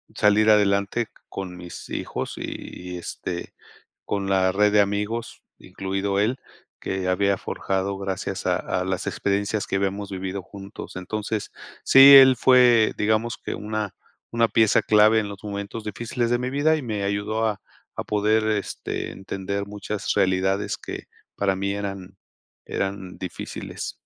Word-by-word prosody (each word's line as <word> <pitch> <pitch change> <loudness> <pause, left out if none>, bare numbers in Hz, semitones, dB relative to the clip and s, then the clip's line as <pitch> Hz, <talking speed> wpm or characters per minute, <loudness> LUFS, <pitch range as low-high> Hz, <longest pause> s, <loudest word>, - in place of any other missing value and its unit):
salir 105 +1 +4
adelante 105 +2 +2 0.2
con 95 -2 -6
mis 90 -1 -9
hijos, - - -4
y 90 0 -7
este, 85 0 -6 0.5
con 100 -1 -2
la 95 -1 +3
red 105 +2 +3
de 105 - +5
amigos, 105 +3 -3 0.2
incluido 95 +1 -3
él, 120 +6 +1 0.4
que 95 -1 -3
había 100 +1 +2
forjado 95 +1 -2
gracias 95 -1 -4
a - - +2
a 90 - -2
las 95 +1 -2
experiencias 100 +2 -1
que - - -1
habíamos 100 +1 -2
vivido 95 0 -4
juntos. 100 +1 -10
Entonces 105 +3 -3 0.3
sí, 135 +1 +9
él 130 -1 +9
fue, 125 -4 +5
digamos 110 +2 +1
que - - -5
una 105 -1 -4 0.4
una 115 -1 +2
pieza 110 -2 +4
clave 110 +1 +5
en 105 - -4
los 100 -1 -9
momentos 100 +2 -5
difíciles 120 +3 -2
de 120 - +2
mi 125 +1 -2
vida, 145 +4 +2
y 155 - -4
me 110 -5 -3
ayudó 100 +3 -1
a 105 -3 -2 0.4
a - - -2
poder 105 +1 +2
este, 100 - -5
entender 95 +1 -4
muchas 105 0 -3
realidades 95 +2 +1
que - - -7 0.3
para 100 -1 +1
mí 100 +1 -1
eran 100 -2 -6 0.5
eran 95 -1 -4
difíciles. 90 - -6
100 Hz, 145 wpm, -24 LUFS, 95-110 Hz, 0.5 s, sí